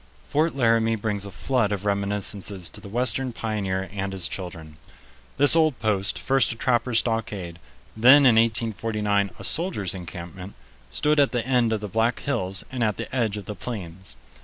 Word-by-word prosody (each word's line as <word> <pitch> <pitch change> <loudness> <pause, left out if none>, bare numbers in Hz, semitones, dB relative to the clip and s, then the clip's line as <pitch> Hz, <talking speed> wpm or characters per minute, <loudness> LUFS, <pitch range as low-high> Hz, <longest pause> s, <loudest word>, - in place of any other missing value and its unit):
Fort 155 +2 +1
Laramie 115 -3 +2
brings 105 -2 -3
a - - -9
flood 110 +3 0
of 100 -1 -3
reminiscences 100 -2 -1
to - - -11
the 100 - -10
western 125 +3 +1
pioneer 100 -5 -3
and 95 -1 -3
his 95 -3 -1
children. 80 -5 -8 0.6
This 145 +3 +7
old 155 -5 +3
post, 100 -3 -1
first 135 -1 +2
a - - -5
trappers' 120 0 +1
stockade, 105 -7 -2 0.4
then 130 +6 +7
in 125 - +7
1849 110 -2 +1
a - - -10
soldiers' 155 - -1
encampment, 90 +1 -8 0.3
stood 150 0 +1
at 140 -2 +3
the 120 -2 -1
end 125 -3 +2
of 110 -2 -1
the 105 - -4
Black 115 +4 0
Hills 95 -9 -2
and 125 -2 -2
at 105 -2 0
the - - -6
edge 110 -5 0
of 100 - -7
the 105 - -5
Plains. 95 - -7
110 Hz, 175 wpm, -24 LUFS, 100-120 Hz, 0.6 s, This